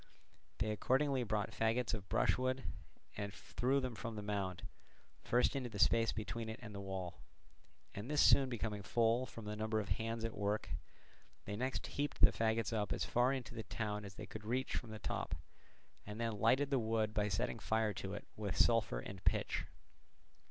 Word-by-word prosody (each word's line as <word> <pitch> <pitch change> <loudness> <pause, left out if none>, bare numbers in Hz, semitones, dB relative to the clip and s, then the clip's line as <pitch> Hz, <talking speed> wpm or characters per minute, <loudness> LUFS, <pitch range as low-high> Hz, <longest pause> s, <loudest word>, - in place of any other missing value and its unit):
They 110 - +1
accordingly 130 +5 +2
brought 110 -2 0
faggots 115 +2 +1
of 100 -3 -4
brushwood 130 +1 +2 0.5
and 100 -1 -3
threw 130 +6 0
them 130 -2 -2
from 115 0 -5
the 105 - -4
mound, 100 -2 -2 0.6
first 125 +4 +3
into 130 -3 -2
the 105 - -7
space 115 +2 +5
between 110 +1 -4
it 110 - -4
and 110 -2 -8
the 100 - -5
wall; 95 -4 -5 0.7
and 105 +6 -6
this 150 -1 +1
soon 135 -3 +7
becoming 110 -3 -2
full 115 +4 +2
from 115 -2 -9
the 105 0 -3
number 110 0 0
of 105 - -4
hands 115 0 -1
at 115 - -3
work, 105 +1 -1 0.8
they 105 - -3
next 130 +4 -1
heaped 145 +1 -2
the - - +9
faggots 115 0 +1
up 105 -2 0
as - - 0
far 125 +2 +3
into 130 -4 -3
the 115 - -4
town 105 -2 -3
as 100 -1 -9
they 105 - -6
could 110 +3 -8
reach 125 +4 -1
from 120 - -3
the 110 - -6
top, - - -2 0.7
and 105 +2 -7
then 115 -3 -1
lighted 130 +7 +4
the 135 - +4
wood 110 -1 +1
by 105 -1 +2
setting 115 +4 -1
fire 110 -1 +1
to 95 0 -4
it - - -7
with 105 -3 -3
sulphur 110 - +3
and 95 +6 -8
pitch. - - +1
110 Hz, 190 wpm, -37 LUFS, 105-120 Hz, 0.8 s, the